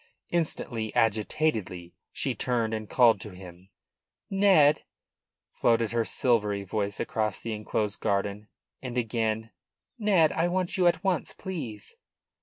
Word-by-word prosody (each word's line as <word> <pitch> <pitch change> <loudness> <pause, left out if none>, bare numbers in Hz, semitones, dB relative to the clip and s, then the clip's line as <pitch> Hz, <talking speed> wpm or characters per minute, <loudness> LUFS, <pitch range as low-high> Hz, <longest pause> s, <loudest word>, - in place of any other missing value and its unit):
Instantly, 120 -9 0
agitatedly, 110 - 0 0.2
she - - -2
turned 115 -3 -1
and 110 -2 -4
called 120 -3 +4
to 105 -4 -9
him. 90 0 -13 0.6
"Ned!" 190 -7 +5 0.7
floated 115 -1 +2
her 115 -1 +1
silvery 105 -6 +1
voice 100 +1 -3
across 110 -2 -1
the 115 - -4
enclosed 105 -1 -2
garden. 100 +1 -1 0.3
And 125 -2 -5
again: 110 -1 -1 0.5
"Ned! 190 -8 +4
I 165 +2 +1
want 185 +2 -1
you 185 -3 +3
at 170 0 +2
once, 185 -4 0
please." 125 - -5
115 Hz, 125 wpm, -28 LUFS, 105-155 Hz, 0.7 s, Ned